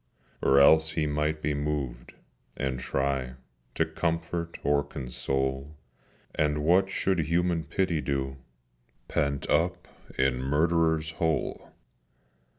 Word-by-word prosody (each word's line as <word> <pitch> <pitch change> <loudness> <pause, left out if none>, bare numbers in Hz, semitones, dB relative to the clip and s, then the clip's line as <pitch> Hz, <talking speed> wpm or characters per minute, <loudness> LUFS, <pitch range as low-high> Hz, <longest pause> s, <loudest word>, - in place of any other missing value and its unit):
Or 70 +1 +5
else 80 +3 +6
he 80 -2 0
might 75 +1 -1
be 75 +1 +1
moved, 75 -3 -3 0.4
and 65 -1 -2
try 65 0 -1 0.4
To - - +2
comfort 85 0 -2
or 70 0 +2
console: 65 +2 -3 0.6
And 75 -1 0
what 95 +4 +4
should 95 -2 0
Human 85 +1 +1
Pity 90 -4 0
do 65 -2 -2 0.7
Pent 70 -1 -1
up 85 +3 +1 0.3
in 65 -1 +2
Murderers' 80 +2 +1
Hole? 80 -2 -1
75 Hz, 110 wpm, -28 LUFS, 70-80 Hz, 0.7 s, else